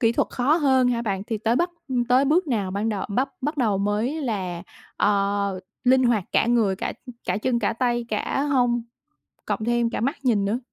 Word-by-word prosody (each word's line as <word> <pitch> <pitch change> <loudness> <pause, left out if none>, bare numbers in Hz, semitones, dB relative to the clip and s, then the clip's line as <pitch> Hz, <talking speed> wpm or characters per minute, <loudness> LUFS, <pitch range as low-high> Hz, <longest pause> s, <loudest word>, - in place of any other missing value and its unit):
kỹ 230 -2 +3
thuật - - 0
khó 275 +6 +2
hơn 265 -5 +3
hả 235 -1 0
bạn? 195 -3 -2
Thì 220 -1 -3
tới 230 +3 +1
bắt 350 +1 +1 0.2
ừm, 245 -2 0
tới 250 +3 +3
bước 320 +5 +2
nào 205 -8 -1
ban 205 +3 -1
đầu 205 -3 -2
bắt 255 +7 0
bắt 295 +3 -2
đầu 215 -7 +1
mới 215 +10 -1
là, 185 -8 -3 0.3
ờ, 200 -1 +1 0.2
linh 260 +1 +5
hoạt 230 -6 +2
cả - - +3
người, 220 -5 +2
cả, - - -3
ừ, 250 - -8
cả - - 0
chân, 240 +1 0
cả 220 0 0
tay, 240 0 0
cả 220 +5 -1
hông, 245 -4 +1 0.6
cộng 215 - -2
thêm 240 0 +1
cả - - -3
mắt 270 +7 0
nhìn 215 -5 +2
nữa? 210 +5 0
235 Hz, 220 wpm, -24 LUFS, 205-255 Hz, 0.6 s, linh